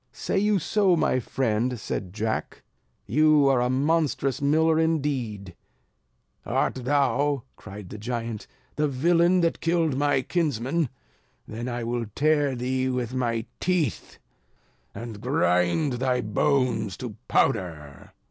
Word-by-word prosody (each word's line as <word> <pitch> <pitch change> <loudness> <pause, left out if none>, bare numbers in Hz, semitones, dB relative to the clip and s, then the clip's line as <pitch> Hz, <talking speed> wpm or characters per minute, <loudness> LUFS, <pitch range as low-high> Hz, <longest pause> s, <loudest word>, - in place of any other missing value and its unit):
"Say 195 - -2
you 210 0 +2
so 190 +1 +2
my 145 -5 +1
friend?" 120 0 -1
said 95 -3 -4
Jack, 110 +2 -3 0.4
"you 150 +3 +4
are 135 -3 +3
a 125 - +1
monstrous 140 -1 0
miller 160 +3 +3
indeed." 135 - -1 0.9
"Art - - 0
thou," 140 +1 +1
cried 100 -1 -10
the 105 - -7
giant, 115 -1 -4 0.3
"the 150 0 +2
villain 170 +6 +3
that 165 -1 0
killed 165 -4 +1
my 140 -1 +1
kinsmen? 150 -2 0 0.6
Then 115 +3 -5
I 120 -1 -3
will 120 -1 -2
tear 145 -2 +2
thee 130 +1 -1
with 125 -1 -2
my 115 -3 -1
teeth, 175 - -1 0.8
and 115 -3 -7
grind 125 - +1
thy 125 0 0
bones 110 - 0
to 120 -5 -6
powder." 80 - -1
130 Hz, 125 wpm, -25 LUFS, 115-150 Hz, 0.9 s, you